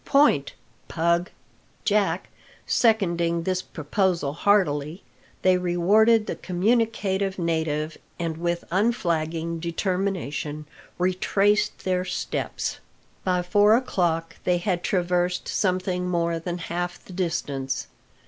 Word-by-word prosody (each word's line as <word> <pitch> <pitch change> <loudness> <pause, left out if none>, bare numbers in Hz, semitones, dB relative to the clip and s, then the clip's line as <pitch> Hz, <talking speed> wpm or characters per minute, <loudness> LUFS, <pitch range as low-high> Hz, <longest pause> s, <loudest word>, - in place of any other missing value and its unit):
Point, 275 - +3 0.3
Pug!" 170 +2 +1 0.6
Jack 210 -1 +1 0.4
seconding 170 -7 +2
this 185 +1 0
proposal 165 -2 -1
heartily, 165 -3 +1 0.4
they 185 -1 +4
rewarded 205 +6 +4
the - - -3
communicative 200 0 0
native, 160 -2 -1 0.2
and 165 -2 -3
with 170 +1 -1
unflagging 170 -5 0
determination 170 -4 -2 0.3
retraced 195 +3 +1
their 180 -1 0
steps. 185 - -3 0.4
By 180 -1 +1
four 205 +4 +5
o'clock 170 -9 0
they 180 -1 +2
had 175 0 -1
traversed 180 -1 0
something 185 -2 0
more 170 -1 0
than 175 +1 -4
half 175 +1 -4
the 185 - -11
distance. 150 -7 -2
180 Hz, 100 wpm, -25 LUFS, 165-195 Hz, 0.6 s, four